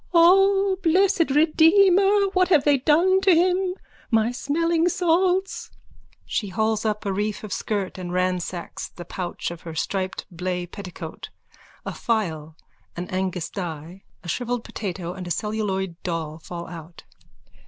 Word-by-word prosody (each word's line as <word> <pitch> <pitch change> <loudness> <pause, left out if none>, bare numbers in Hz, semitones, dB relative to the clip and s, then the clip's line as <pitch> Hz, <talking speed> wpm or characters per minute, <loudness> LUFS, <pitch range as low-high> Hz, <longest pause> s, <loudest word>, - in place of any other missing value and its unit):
_ - - -40
O 390 +2 +5
blessed 365 -1 +3
Redeemer, 375 +7 +5
what 370 -1 +3
have 320 -6 +4
they 285 -2 +3
done 345 +8 +3
to 380 -3 +5
him! 365 +2 +2 0.3
My 225 0 +2
smelling 330 +6 +1
salts! 360 +2 +1 0.6
_(She 205 -4 -2
hauls 220 +2 0
up 215 0 -1
a 200 - 0
reef 210 +2 -2
of 210 - -5
skirt 200 -3 -3
and 175 -1 -5
ransacks 180 -1 -2
the 175 - -10
pouch 175 -1 -4
of 170 0 -9
her 165 -2 -8
striped 190 +3 -2
blay 180 +1 -3
petticoat. 180 -3 -8 0.6
A - - -4
phial, 160 -9 -2 0.4
an 175 +1 -5
Agnus 185 -2 -2
Dei, 175 0 -6 0.2
a - - -10
shrivelled 245 +6 -2
potato 180 -4 -5
and 180 -1 -7
a - - -4
celluloid 190 -4 -2
doll 165 -3 -4
fall 170 +1 -7
out.) 165 -1 -10
215 Hz, 145 wpm, -24 LUFS, -, 0.6 s, O